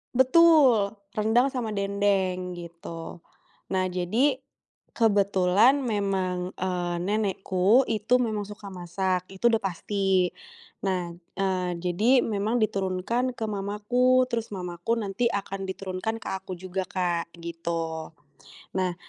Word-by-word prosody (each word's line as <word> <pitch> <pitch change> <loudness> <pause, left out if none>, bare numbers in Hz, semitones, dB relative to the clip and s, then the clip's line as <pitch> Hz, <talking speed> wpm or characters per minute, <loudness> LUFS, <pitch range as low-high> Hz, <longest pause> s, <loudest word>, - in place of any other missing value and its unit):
Betul. 260 -6 +5 0.2
Rendang 225 +5 +3
sama 235 -5 -3
Dendeng, 195 -2 0
gitu. 170 -1 -8 0.5
Nah, 185 0 +2
jadi, 225 +10 +1 0.6
kebetulan 205 +3 +4
memang, 190 -5 -1
eee, 180 -1 -1
nenekku 200 +3 +2
itu 225 +3 +2
memang 220 -4 -1
suka 205 -1 -9
masak, 185 +1 -2
itu 195 +4 -6
udah 225 -1 +2
pasti. 190 -1 0 0.5
Nah, 180 -3 -1 0.2
eee, 185 -2 0
jadi 210 +9 +3
memang 215 +2 0
diturunkan 210 +5 0
ke 225 - -2
mamaku, 215 +5 +2
terus 230 -2 -2
mamaku 180 +3 -3
nanti 205 +1 -1
akan 195 -2 -4
diturunkan 190 +3 -3
ke - - -7
aku 190 -1 -7
juga 185 +1 -3
Kak, 175 -2 -1
gitu. 165 -1 -4 0.7
Nah, 185 -2 0
195 Hz, 115 wpm, -26 LUFS, 180-220 Hz, 0.7 s, Betul